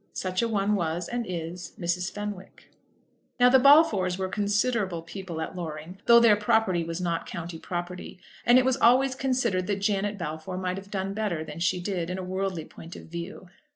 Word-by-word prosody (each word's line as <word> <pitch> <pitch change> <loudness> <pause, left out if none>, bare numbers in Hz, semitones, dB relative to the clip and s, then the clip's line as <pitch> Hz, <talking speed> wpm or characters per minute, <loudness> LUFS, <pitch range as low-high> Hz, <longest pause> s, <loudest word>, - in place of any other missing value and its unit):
Such 185 +1 -2
a 235 - +1
one 210 -2 +1
was, 170 -2 -1
and 240 -2 -3
is, 170 0 -5
Mrs. 175 +1 -1
Fenwick. 205 -2 -8 0.7
Now 245 0 +7
the 265 +1 +6
Balfours 250 - +5
were 190 -1 -2
considerable 205 -3 0
people 170 -1 -7
at 160 - -5
Loring, 165 +1 -7
though 235 0 +9
their 230 -3 +6
property 210 -4 +2
was 165 +1 -4
not 170 -2 -2
county 170 -1 -6
property; 175 +1 -6 0.3
and 240 +1 +6
it 255 - +4
was 260 0 +2
always 260 +2 +4
considered 255 -9 0
that 205 - +1
Janet 200 0 0
Balfour 160 +1 -5
might 185 0 -2
have 195 +1 -9
done 195 -1 -3
better 200 -7 -2
than 155 0 -8
she 180 +1 +1
did, 180 -2 -3
in 180 - -3
a 190 - -4
worldly 185 -3 -3
point 165 +1 -11
of - - -11
view. 170 +2 -7
185 Hz, 190 wpm, -27 LUFS, 175-210 Hz, 0.7 s, though